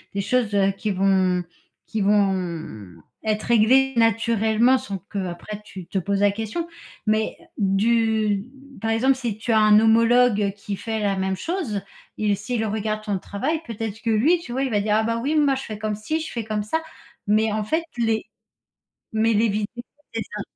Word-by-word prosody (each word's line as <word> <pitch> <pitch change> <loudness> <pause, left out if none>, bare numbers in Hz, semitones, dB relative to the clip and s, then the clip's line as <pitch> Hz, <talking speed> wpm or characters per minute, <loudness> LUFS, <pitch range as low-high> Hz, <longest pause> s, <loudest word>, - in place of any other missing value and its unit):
des 200 - 0
choses, 220 +1 0
heu, 195 -1 +3
qui 195 +2 -4
vont 190 -2 +2 0.4
qui 220 - -3
vont 180 - 0 0.3
être 215 -1 -1
réglées 255 +4 +4
naturellement 225 +1 +3
sans 200 -6 -5
qu'après 200 +2 -5
tu 190 -3 -9
te 195 - -3
poses 200 +2 -1
la 205 0 +5
question 225 +11 -4 0.4
mais 215 0 +1 0.2
du 215 0 +2 0.4
par 225 - -1
exemple, 260 +4 +3
si 240 -5 -3
tu 230 +2 -3
as 220 - +5
un 215 0 +6
homologue 225 -2 +4
qui 205 0 -5
fait 220 +1 -3
la 200 -2 0
même 190 0 -1
chose, 280 - -3 0.4
il 210 -1 +1
s'il 220 +3 -2
regarde 215 0 -2
ton 205 -3 -2
travail 305 - -2
peut-être 220 -2 -5
que 230 - -2
lui, 270 +11 +3
tu 325 - -9
vois? 265 +3 -1
Il 265 - -1
va 210 - +2
dire: 210 +1 +1
«Ah, 220 - +3
bah, 230 +1 -1
oui, 290 +5 0
moi, 290 -3 +4
je 265 - -4
fais 215 - -6
comme 215 0 -2
ci, 215 +10 -2
je 320 - -6
fais 235 - -3
comme 215 -1 -2
ça» 320 +10 -1 0.5
mais 215 +1 +3
en 215 0 -1
fait, 320 +9 0
les 225 -2 0 0.9
mais 225 +1 +2
les 220 +2 +3
vidéos, 210 +3 -3 0.3
c'est 225 - -1
ça. 210 0 -7
215 Hz, 190 wpm, -23 LUFS, 200-230 Hz, 0.9 s, un